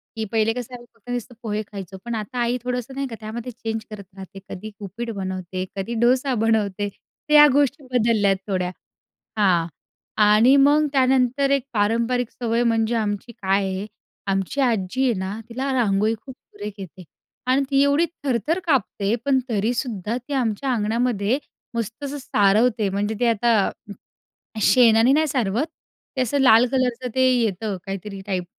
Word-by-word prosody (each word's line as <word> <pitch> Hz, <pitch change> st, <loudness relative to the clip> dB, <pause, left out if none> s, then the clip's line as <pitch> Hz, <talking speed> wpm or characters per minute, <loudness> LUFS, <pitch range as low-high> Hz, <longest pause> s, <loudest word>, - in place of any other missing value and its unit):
की 220 Hz, -, -3 dB
पहिले 225 Hz, 0 st, +2 dB
कसं 250 Hz, +1 st, -6 dB
आहे 240 Hz, -, -11 dB
फक्त 230 Hz, +1 st, -18 dB
नुसतं 245 Hz, 0 st, -4 dB
पोहे 215 Hz, -1 st, -2 dB
खायचो. 195 Hz, -2 st, -8 dB
पण 235 Hz, -1 st, -3 dB
आता 240 Hz, +4 st, -4 dB
आई 240 Hz, +1 st, +1 dB
थोडंसं 250 Hz, +1 st, -3 dB
नाही 275 Hz, 0 st, -2 dB
का 230 Hz, -, -7 dB
त्यामध्ये 225 Hz, +3 st, -6 dB
चेंज 225 Hz, -1 st, -5 dB
करत 210 Hz, -2 st, -8 dB
राहते. 195 Hz, 0 st, -10 dB
कधी 215 Hz, +3 st, -7 dB
उपीठ 210 Hz, +4 st, -6 dB
बनवते, 185 Hz, -1 st, -4 dB
कधी 195 Hz, +5 st, -3 dB
डोसा 255 Hz, +2 st, +3 dB
बनवते. 210 Hz, -3 st, +1 dB
तर 300 Hz, +8 st, -9 dB
या 295 Hz, 0 st, +9 dB
गोष्टी 285 Hz, +1 st, +1 dB
बदलल्यात 220 Hz, -4 st, +3 dB
थोड्या. 185 Hz, -3 st, -1 dB, 0.7 s
हां. 180 Hz, -5 st, +3 dB, 0.6 s
आणि 215 Hz, +6 st, +6 dB
मग 300 Hz, +1 st, +4 dB
त्यानंतर 265 Hz, +1 st, +2 dB
एक 275 Hz, -2 st, +2 dB
पारंपरिक 230 Hz, +3 st, +1 dB
सवय 235 Hz, 0 st, -1 dB
म्हणजे 230 Hz, 0 st, +1 dB
आमची 215 Hz, +1 st, -2 dB
काय 195 Hz, -2 st, 0 dB
आहे, 190 Hz, +2 st, -3 dB, 0.4 s
आमची 195 Hz, +8 st, -1 dB
आजी 235 Hz, 0 st, 0 dB
आहे 255 Hz, -3 st, +3 dB
ना 190 Hz, +3 st, -4 dB
तिला 265 Hz, +4 st, -3 dB
रांगोळी 215 Hz, -3 st, +2 dB
खूप 265 Hz, -2 st, -9 dB
सुरेख 210 Hz, -5 st, -9 dB
येते. 185 Hz, -1 st, -9 dB, 0.4 s
आणि 260 Hz, +2 st, +3 dB
ती 275 Hz, -1 st, +3 dB
एवढी 285 Hz, +4 st, +3 dB, 0.2 s
थरथर 270 Hz, -, 0 dB
कापते, 235 Hz, -, +1 dB
पण 275 Hz, -2 st, +3 dB
तरीसुद्धा 225 Hz, 0 st, -1 dB
ती 255 Hz, +4 st, -7 dB
आमच्या 255 Hz, 0 st, 0 dB
अंगणामध्ये 230 Hz, +1 st, 0 dB, 0.4 s
मस्त 230 Hz, +4 st, -4 dB
असं 285 Hz, +1 st, -4 dB
सारवते 215 Hz, -2 st, +2 dB
म्हणजे 205 Hz, +3 st, -1 dB
ती 245 Hz, -, +2 dB
आता 230 Hz, -2 st, +2 dB, 0.9 s
शेणाने 230 Hz, +3 st, +5 dB
नाही 310 Hz, +2 st, +3 dB
सारवत, 250 Hz, -1 st, 0 dB, 0.5 s
ते -, -, 0 dB
असं 255 Hz, +3 st, 0 dB
लाल 245 Hz, -2 st, +6 dB
कलरचं 255 Hz, -1 st, 0 dB
ते 260 Hz, 0 st, +4 dB
येतं 210 Hz, -2 st, -1 dB
काहीतरी 195 Hz, 0 st, -6 dB
टाईप. 185 Hz, -3 st, -2 dB
230 Hz, 160 wpm, -22 LUFS, 205-255 Hz, 0.9 s, या